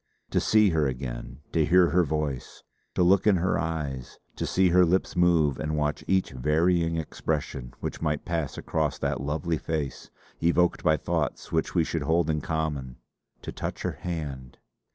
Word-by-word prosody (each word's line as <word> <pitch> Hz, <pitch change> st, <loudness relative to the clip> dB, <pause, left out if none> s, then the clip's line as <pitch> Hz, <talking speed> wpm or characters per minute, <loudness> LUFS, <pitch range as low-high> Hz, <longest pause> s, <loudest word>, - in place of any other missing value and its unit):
To -, -, +2 dB
see 105 Hz, -3 st, +4 dB
her 80 Hz, -3 st, +2 dB
again; 65 Hz, +1 st, -5 dB
to 80 Hz, -, +2 dB
hear 90 Hz, +2 st, +4 dB
her 90 Hz, +1 st, +4 dB
voice; 75 Hz, -4 st, -3 dB, 0.3 s
to -, -, +3 dB
look 95 Hz, +3 st, +4 dB
in 105 Hz, -, +6 dB
her 90 Hz, +1 st, +1 dB
eyes; 75 Hz, -6 st, -4 dB, 0.2 s
to -, -, -3 dB
see 95 Hz, 0 st, +3 dB
her 90 Hz, +1 st, +5 dB
lips 90 Hz, +2 st, +1 dB
move 85 Hz, -6 st, +3 dB
and 75 Hz, 0 st, -2 dB
watch 75 Hz, 0 st, -1 dB
each 95 Hz, -1 st, +1 dB
varying 80 Hz, +5 st, +1 dB
expression 75 Hz, -5 st, -3 dB
which -, -, -4 dB
might 75 Hz, -2 st, -1 dB
pass 80 Hz, -4 st, -2 dB
across 80 Hz, -4 st, -1 dB
that 65 Hz, -, -2 dB
lovely 75 Hz, +3 st, -1 dB
face, 75 Hz, -4 st, -4 dB, 0.3 s
evoked 85 Hz, +1 st, +2 dB
by 80 Hz, -2 st, +4 dB
thoughts 80 Hz, -5 st, -2 dB
which 80 Hz, +2 st, -1 dB
we 85 Hz, -, +4 dB
should 80 Hz, 0 st, -2 dB
hold 80 Hz, +2 st, +2 dB
in 75 Hz, -1 st, -1 dB
common; 75 Hz, -6 st, -3 dB, 0.5 s
to -, -, -5 dB
touch -, -, -5 dB
her -, -, -3 dB
hand.... 70 Hz, -7 st, -5 dB
80 Hz, 175 wpm, -27 LUFS, 75-85 Hz, 0.5 s, in